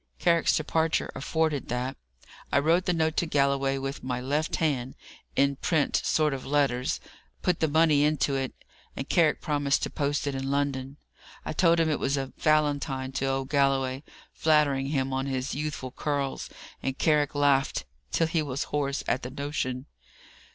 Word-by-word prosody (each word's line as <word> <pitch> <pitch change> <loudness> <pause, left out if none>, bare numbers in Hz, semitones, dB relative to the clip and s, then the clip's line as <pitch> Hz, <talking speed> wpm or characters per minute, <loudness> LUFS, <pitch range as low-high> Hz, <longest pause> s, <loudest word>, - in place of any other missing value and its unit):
Carrick's 170 -2 +3
departure 160 +1 0
afforded 155 0 -1
that. 125 +2 -2 0.6
I - - +3
wrote 165 +5 +3
the - - +2
note 160 -1 +1
to 170 - +1
Galloway 140 -2 +2
with 135 +1 -5
my 125 -1 -2
left 145 +5 -1
hand, 135 -6 -1 0.4
in 140 0 +2
print 155 -2 +1
sort 155 -2 +2
of 135 - -5
letters, 135 -3 +1 0.4
put 180 -2 +1
the 160 - +2
money 155 -1 +4
into 150 -2 +2
it, 135 -1 -1 0.4
and 135 - -5
Carrick 165 -4 +3
promised 145 -2 +1
to - - -2
post 145 0 -1
it 140 - -1
in 135 0 -3
London. 140 -1 -1 0.5
I - - -3
told 170 +1 +4
him 165 - +3
it 150 -2 0
was 135 +1 0
a 135 -1 -4
Valentine 145 -3 +1
to 135 - -2
old 135 0 -1
Galloway, 135 -2 +1 0.3
flattering 150 -4 +2
him 135 -2 -1
on 135 +1 -1
his 130 -1 -2
youthful 145 -3 -4
curls, 140 -1 -2 0.3
and 135 0 -2
Carrick 150 -2 +2
laughed 140 -1 +2 0.3
till 165 - +2
he 160 0 0
was 140 -2 -2
hoarse, 140 -2 0
at 130 - +1
the 125 - -5
notion. 130 -2 -3
140 Hz, 170 wpm, -27 LUFS, 135-155 Hz, 0.6 s, money